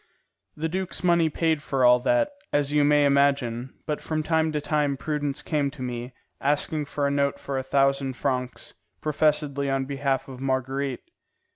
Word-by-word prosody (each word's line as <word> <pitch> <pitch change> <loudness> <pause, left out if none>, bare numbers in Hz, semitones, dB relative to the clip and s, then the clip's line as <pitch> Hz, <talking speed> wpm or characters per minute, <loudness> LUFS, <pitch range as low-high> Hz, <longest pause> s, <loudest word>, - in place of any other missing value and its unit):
The 160 +2 -2
duke's 185 +3 -3
money 170 -2 +4
paid 160 0 0
for 135 -3 +1
all 125 0 +7
that, 295 - +2 0.2
as 145 0 +1
you 150 -1 +4
may 145 0 +4
imagine; 140 -3 +1
but 150 -1 -2
from 155 -1 -2
time 160 0 +1
to 150 - 0
time 145 -1 0
Prudence 145 -1 -2
came 145 -3 0
to 135 -2 -8
me, 125 0 -4 0.3
asking 150 +2 +1
for 145 0 -2
a 140 - +1
note 140 0 +1
for 140 - -5
a 130 - 0
thousand 135 0 +1
francs, 125 -1 -3 0.3
professedly 150 -2 +1
on 135 0 0
behalf 135 -1 -1
of 130 -2 -9
Marguerite. 135 0 -1
140 Hz, 170 wpm, -25 LUFS, 135-150 Hz, 0.3 s, all